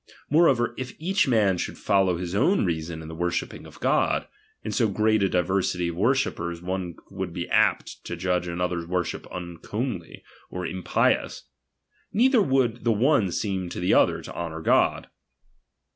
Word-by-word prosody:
Moreover, 140 Hz, -7 st, +4 dB
if 130 Hz, -1 st, -6 dB
each 185 Hz, +2 st, +1 dB
man 105 Hz, -7 st, +3 dB
should -, -, -4 dB
follow 95 Hz, -4 st, +2 dB
his 90 Hz, 0 st, -5 dB
own 175 Hz, -, +3 dB
reason 80 Hz, -1 st, -3 dB
in -, -, -9 dB
the 80 Hz, -, -7 dB
wornhipping 85 Hz, +1 st, -3 dB
of -, -, -15 dB
God, -, -, +1 dB, 0.4 s
in 110 Hz, -, -3 dB
so 110 Hz, +2 st, +2 dB
great 110 Hz, +1 st, +2 dB
a 95 Hz, -, +2 dB
diversity 90 Hz, -1 st, 0 dB
of 85 Hz, -, -5 dB
worshippers 95 Hz, -6 st, 0 dB
one 90 Hz, -1 st, -4 dB, 0.2 s
would 95 Hz, -2 st, -4 dB
be 85 Hz, -, -4 dB
apt -, -, +1 dB
to -, -, -4 dB
judge 90 Hz, -1 st, -1 dB
another's 85 Hz, -1 st, -2 dB
worship 90 Hz, -1 st, -2 dB
uncomely, 90 Hz, +3 st, -5 dB, 0.3 s
or 90 Hz, 0 st, -5 dB
impious; 90 Hz, +1 st, 0 dB, 0.7 s
neither 245 Hz, +2 st, +4 dB
would 130 Hz, -, +1 dB
the 120 Hz, -, +3 dB
one 115 Hz, -, +3 dB
seem 95 Hz, -2 st, -2 dB
to -, -, -6 dB
the 90 Hz, -, +2 dB
other -, -, +3 dB
to -, -, -8 dB
honour 80 Hz, -2 st, -5 dB
God. -, -, +2 dB
95 Hz, 160 wpm, -25 LUFS, 85-115 Hz, 0.7 s, Moreover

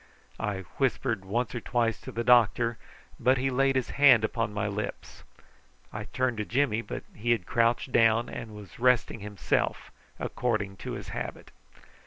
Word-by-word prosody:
I 100 Hz, -2 st, -2 dB, 0.2 s
whispered 125 Hz, -5 st, 0 dB
once 115 Hz, +6 st, -2 dB
or 120 Hz, -, -4 dB
twice 115 Hz, -2 st, 0 dB
to -, -, -8 dB
the 120 Hz, -, -3 dB
doctor, 120 Hz, -1 st, +4 dB, 0.4 s
but 130 Hz, +1 st, +3 dB
he 135 Hz, +2 st, 0 dB
laid 135 Hz, +1 st, +2 dB
his 130 Hz, -, 0 dB
hand 135 Hz, -6 st, +6 dB
upon 115 Hz, -1 st, -1 dB
my 105 Hz, 0 st, -2 dB
lips. 100 Hz, 0 st, -5 dB, 0.7 s
I -, -, -5 dB
turned 125 Hz, -3 st, -1 dB
to 105 Hz, -, -1 dB
Jimmy, 120 Hz, -2 st, +1 dB
but -, -, -6 dB
he 115 Hz, +3 st, -4 dB
had 105 Hz, -7 st, -3 dB
crouched 115 Hz, +4 st, +1 dB
down, 115 Hz, 0 st, +4 dB
and 110 Hz, -3 st, -7 dB
was 105 Hz, 0 st, -12 dB
resting 125 Hz, -2 st, +2 dB
himself 105 Hz, 0 st, -2 dB, 0.3 s
according 110 Hz, -5 st, -2 dB
to -, -, -6 dB
his -, -, -7 dB
habit. -, -, -6 dB
115 Hz, 165 wpm, -28 LUFS, 105-125 Hz, 0.7 s, hand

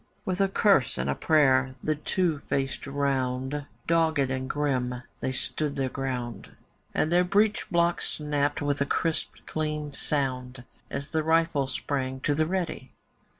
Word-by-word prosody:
With 185 Hz, +1 st, 0 dB
a 195 Hz, -, +5 dB
curse 195 Hz, -, +3 dB
and 65 Hz, +2 st, 0 dB
a -, -, +2 dB
prayer 130 Hz, -, +3 dB
the 155 Hz, -, +2 dB
two 160 Hz, +1 st, 0 dB
faced 135 Hz, 0 st, -1 dB
round, 135 Hz, 0 st, -1 dB, 0.2 s
Dogged 160 Hz, -5 st, +2 dB
and 130 Hz, 0 st, -2 dB
grim 125 Hz, -4 st, -1 dB, 0.2 s
they 130 Hz, -, -1 dB
stood 145 Hz, +2 st, -2 dB
their 135 Hz, -1 st, 0 dB
ground, 125 Hz, -3 st, -4 dB, 0.4 s
And 155 Hz, -, 0 dB
their 175 Hz, +1 st, +5 dB
breech 205 Hz, +4 st, +2 dB
blocks 170 Hz, -1 st, +1 dB
snapped 145 Hz, -1 st, -1 dB
with 145 Hz, -1 st, 0 dB
a -, -, +3 dB
crisp 165 Hz, -2 st, 0 dB
clean 150 Hz, -2 st, -3 dB
sound 130 Hz, -4 st, -1 dB, 0.3 s
As 140 Hz, +1 st, -5 dB
the 160 Hz, -, +1 dB
rifles 160 Hz, -4 st, +2 dB
sprang 130 Hz, -2 st, -2 dB
to 145 Hz, -, +1 dB
the 155 Hz, +2 st, +1 dB
'ready. 175 Hz, -7 st, -3 dB
145 Hz, 150 wpm, -27 LUFS, 130-160 Hz, 0.4 s, a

